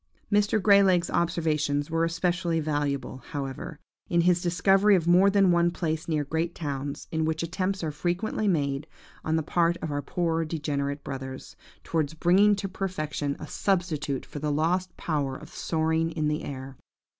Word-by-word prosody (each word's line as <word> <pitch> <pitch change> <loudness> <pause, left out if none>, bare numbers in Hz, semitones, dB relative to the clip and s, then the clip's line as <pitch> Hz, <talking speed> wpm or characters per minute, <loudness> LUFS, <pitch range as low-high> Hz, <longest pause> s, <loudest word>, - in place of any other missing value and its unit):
"Mr. 205 +1 +3
Grey 200 0 +6
leg's 180 -3 +3
observations 155 -3 0
were 165 0 +1
especially 170 0 0
valuable, 145 -4 -2
however, 140 +3 -5 0.3
in 170 0 +3
his 175 0 +3
discovery 195 +4 +4
of 170 -4 +1
more 180 +3 +6
than 195 -2 +4
one 170 0 +3
place 160 -2 -3
near 155 -3 0
great 160 +4 -2
towns, 140 -2 -4
in 160 -1 0
which 160 +1 -1
attempts 185 +2 -2
are 155 - -1
frequently 180 +7 -1
made, 145 -4 0 0.4
on 160 - 0
the 160 - +1
part 170 +2 +1
of 160 - -5
our 145 0 -1
poor 165 +2 -1
degenerate 145 -3 -3
brothers, 130 -1 -7 0.3
towards 160 -2 -1
bringing 190 +5 +4
to 200 - -3
perfection 155 -7 -3
a - - -6
substitute 160 -7 -1
for 145 - -8
the 150 0 -1
lost 175 +5 0
power 145 -5 -1
of 155 - -12
soaring 160 0 0
in 155 -2 -1
the 150 +2 -2
air. 135 -1 -7
160 Hz, 170 wpm, -27 LUFS, 150-180 Hz, 0.4 s, Grey